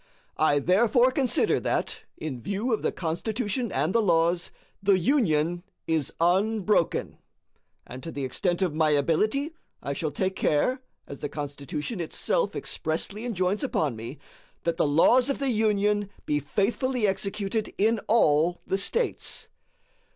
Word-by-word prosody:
I 155 -2 +4
therefore 220 - +4
consider 260 -2 +2
that, - - -2
in 135 -6 -5
view 205 - -1
of 220 - 0
the - - 0
Constitution 215 +7 -2
and 150 +6 0
the 230 - +4
laws, 170 -2 +2 0.3
the 195 -1 +4
Union 175 - +1 0.2
is 160 -4 0
unbroken; 195 +2 +1 0.7
and 125 +2 -9
to 165 - -6
the 140 -3 -3
extent 175 +8 0
of 175 -5 0
my 155 0 +2
ability 210 - +1 0.3
I 140 - -4
shall 155 +2 -2
take 185 +6 -2
care, 250 - +1 0.2
as 140 - -9
the 145 - -4
Constitution 145 - -5
itself 320 - 0
expressly 185 +7 -2
enjoins 195 -3 0
upon 145 -6 0
me, 115 +6 -7 0.5
that 170 -1 -1
the - - +2
laws 240 - +4
of 275 - 0
the 275 -2 0
Union 210 -2 +1 0.2
be 150 0 +1
faithfully 230 - 0
executed 200 +2 -1
in 220 +2 +2
all 175 -5 +3
the 195 - -1
States. 465 - -2
185 Hz, 145 wpm, -26 LUFS, 155-220 Hz, 0.7 s, I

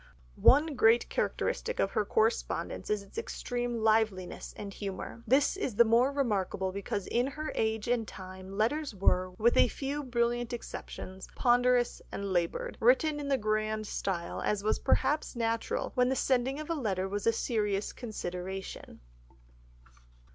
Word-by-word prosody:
One 300 +3 +6
great 235 -2 +4
characteristic 485 +1 -1
of - - +2
her - - 0
correspondence 455 +1 0
is 210 -1 0
its 200 - -7
extreme 245 - -3
liveliness 215 -4 +1
and 200 -1 -6
humour. 200 +3 -6
This 270 - +4
is 275 - -3
the 235 - +6
more 235 +4 +4
remarkable 200 -8 0
because 200 0 -3
in 245 +2 +1
her 305 +2 -4
age 220 0 -1
and 235 -2 +1
time 190 0 -9
letters 270 +4 0
were, 185 -1 +2
with 235 +2 +3
a - - +6
few 280 +4 -3
brilliant 240 -1 0
exceptions, 190 -5 -7
ponderous 245 0 +3
and 200 -1 -3
laboured, 170 -2 -1
written 295 +6 +3
in 285 - -4
the 275 -1 +2
grand 215 -1 -1
style, 185 -4 -3
as 205 -1 0
was 215 - +1
perhaps 275 +2 +1
natural 230 -1 -1
when 250 0 +3
the 265 - +1
sending 260 +2 +1
of 305 +2 -5
a - - +2
letter 195 - -1
was 205 +2 -3
a - - +7
serious 210 -3 -1
consideration. 190 - -6
230 Hz, 155 wpm, -30 LUFS, 200-260 Hz, -, a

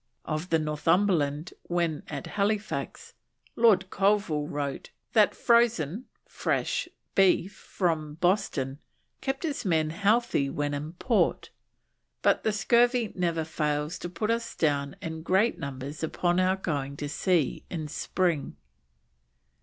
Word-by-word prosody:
Of 155 +3 -3
the 165 - +4
Northumberland 155 0 +1
when 170 -3 0
at - - -5
Halifax, 210 +1 -2 0.4
Lord 195 -5 +4
Colville 195 -7 +1
wrote 140 -2 -4 0.2
that 215 -2 +4
frozen 235 - +2 0.2
(fresh) - - -1 0.2
beef 195 0 +3
from 155 -5 -2
Boston 165 -7 0 0.4
kept 270 +3 -2
his 290 -6 -2
men 160 -5 +1
healthy 205 - +2
when 145 +1 -2
in 150 +3 -4
port, 225 +5 0 0.7
"but - - +4
the 220 - +2
scurvy 235 +2 +3
never 170 -3 0
fails 150 0 -2
to 175 - -5
pull 215 +5 -1
us 230 0 -2
down 145 -3 0
in 160 -1 -5
great 190 +7 +2
numbers 140 +2 -6
upon 175 +2 0
our 185 +1 +3
going 140 -7 -3
to 145 - -4
sea 165 0 0
in 160 -3 -4
spring." 165 - -1
170 Hz, 125 wpm, -28 LUFS, 150-205 Hz, 0.7 s, the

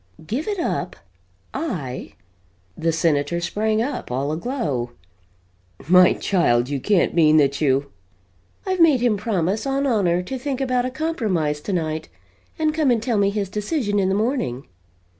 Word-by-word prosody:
"Give 245 - -3
it 415 -1 -1
up! 340 - -2 0.6
I!" 140 - -4 0.6
The 165 0 0
Senator 160 0 +1
sprang 215 +5 0
up, 275 +2 -4
all 135 +4 -1
aglow: 155 - -2 0.9
"My 180 +1 +7
child, 125 -10 +1
you 140 -1 -2
can't 200 +6 +2
mean 155 -2 +5
that 140 -1 +2
you 140 -1 +1 0.4
" 90 0 -38
"I've 375 -1 -1
made 305 -7 +5
him 240 -3 +3
promise 205 +1 -1
on 275 +1 0
honor 185 -8 +1
to 260 +8 -5
think 270 0 -3
about 255 -2 0
a - - -1
compromise 215 - -1
tonight 160 -4 -3 0.5
and 310 -2 +1
come 310 -3 +2
and 240 -2 +3
tell 230 -3 +1
me 200 0 +3
his 200 -1 -2
decision 210 - -1
in 190 -1 +1
the 190 - +1
morning." 215 - -1
200 Hz, 160 wpm, -22 LUFS, 155-250 Hz, 0.9 s, My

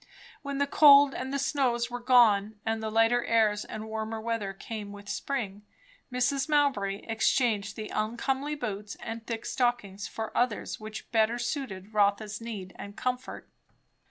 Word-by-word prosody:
When 280 -1 -4
the 285 - +2
cold 285 -1 +7
and 260 +1 -4
the 280 - 0
snows 255 -4 0
were 245 - -3
gone, 220 -4 +4
and 225 0 -1
lighter 225 +2 +2
airs 215 -2 +2
and 215 0 -7
warmer 220 0 -4
weather 225 -3 -2
came 210 +2 -7
in 200 - -9
with 205 0 -11
spring, 210 -6 -3 0.5
Mrs. 270 +3 0
Mowbray 265 -10 +1
exchanged 225 -2 +1
the 215 -1 -6
uncomely 265 +7 -1
boots 210 -6 -5
and 230 0 -7
thick 230 -1 -4
stockings 210 -6 -1
for 220 -1 -6
others 240 -3 0
which 215 0 -8
better 225 0 +3
suited 235 -6 -4
Rotha's 210 +1 +1
need 205 -5 -6
and 200 0 -8
comfort. 255 +1 -3
225 Hz, 155 wpm, -29 LUFS, 210-250 Hz, 0.5 s, cold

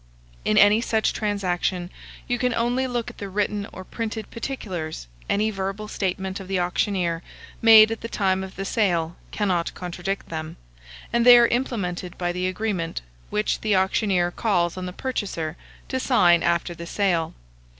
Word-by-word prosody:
In 105 - +2
any 205 +2 +6
such 220 -2 +1
transaction 185 -3 -1 0.4
you 245 -1 0
can 250 -2 +1
only 245 +3 +1
look 240 -1 -3
at - - -19
the 200 - -5
written 205 +1 -1
or 190 - -8
printed 220 +1 -5
particulars; 185 - -5 0.2
any 215 +2 +2
verbal 195 +1 -4
statement 190 -1 -3
of 190 - -9
the 190 -1 0
auctioneer, 180 -1 0 0.4
made 220 -1 +8
at 225 - -4
the 230 - -4
time 190 -3 +1
of 190 0 -9
the 195 - -4
sale, 175 -6 +1
cannot 180 -5 -1
contradict 180 +2 -4
them, 160 -1 -5 0.6
and 235 0 +3
they 245 0 +10
are 240 - +7
implemented 200 -8 -2
by 175 -1 -1
the 180 +1 -1
agreement, 185 -3 -2 0.3
which 210 0 0
the 215 -2 +2
auctioneer 190 -2 +2
calls 175 -5 0
on 185 0 -5
the - - -5
purchaser 185 -8 -3 0.3
to 260 - -2
sign 180 -10 +4
after 170 0 0
the 170 0 -8
sale. 175 -4 0
195 Hz, 165 wpm, -24 LUFS, 175-220 Hz, 0.6 s, they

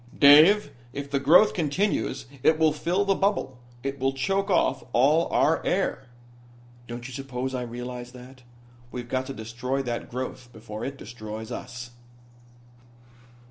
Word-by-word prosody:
"Dave, 150 +5 +7 0.2
if 140 0 -6
the 140 - +1
growth 170 +10 +6
continues 180 +3 -1 0.2
it 155 - +4
will 160 -1 +3
fill 175 +6 0
the 195 - +3
bubble. 195 -10 -1 0.2
It 135 0 -3
will 135 +1 +1
choke 195 +8 -1
off 130 - +2
all 150 +7 +4
our 160 - +2
air." 175 -8 -1 0.8
"Don't 120 +1 -7
you 130 - -9
suppose 130 0 -4
I 130 - -2
realize 125 +1 -6
that? 130 +1 -13 0.5
We've 120 -1 -6
got 130 +1 -2
to 135 - -5
destroy 120 +5 -3
that 120 -2 -4
growth 125 0 -6
before 110 -1 -8
it 140 +2 -4
destroys 110 -1 -8
us." 120 0 -7
130 Hz, 145 wpm, -26 LUFS, 120-150 Hz, 0.8 s, Dave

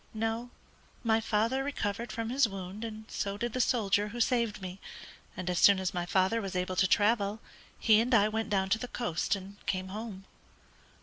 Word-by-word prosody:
"No; 225 +2 -2 0.5
my 225 -1 +3
father 225 +5 +1
recovered 230 -5 -3
from 225 +1 -3
his 260 -3 +3
wound, 195 +2 -7
and 220 -1 -6
so 200 0 -3
did 235 +1 -3
the 255 - +1
soldier 210 -5 +2
who 235 +3 -7
saved 235 -3 +1
me, 185 0 -7 0.6
and 185 - -5
as 180 -1 +1
soon 200 -1 +7
as 190 +2 -2
my 175 -1 -2
father 190 +5 +2
was 195 -2 -5
able 180 0 -1
to 190 - +4
travel, 205 +1 +2 0.4
he 215 -2 +5
and 245 +3 -1
I 210 -1 +5
went 220 +1 -2
down 190 -2 +1
to 220 +2 +2
the 250 - -4
coast 210 -7 -1
and 195 +1 -10
came 185 0 -1
home." 205 -1 -7
210 Hz, 195 wpm, -30 LUFS, 195-230 Hz, 0.6 s, soon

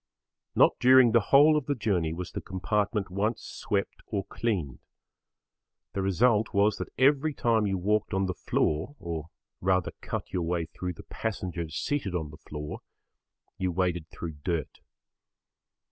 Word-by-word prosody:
Not - - +6
during 130 -1 +7
the 115 - +6
whole 150 +3 +7
of 150 -4 -1
the 145 - +1
journey 95 -9 0
was 90 +2 -5
the - - -5
compartment 100 +1 -1
once 105 +5 -1
swept 100 -1 -3
or 100 -3 -2
cleaned. 90 - -2 1.1
The 100 - -1
result 105 +3 +2
was 100 +1 +3
that - - -5
every 140 +3 +3
time 115 -3 +2
you 95 -1 0
walked 105 +3 +1
on 95 -1 +1
the 90 - -1
floor 80 - -1
or 80 -2 -5 0.3
rather 95 -1 +1
cut - - -5
your 90 - 0
way 85 0 -1
through 90 +3 -5
the - - -12
passengers 90 -7 -4
seated 135 - -1
on 80 -4 -3
the 75 - -12
floor, 75 0 -5 0.8
you 95 -1 0
waded 85 -2 -1
through 80 -3 -7
dirt. 85 -6 -2
95 Hz, 155 wpm, -28 LUFS, 85-110 Hz, 1.1 s, during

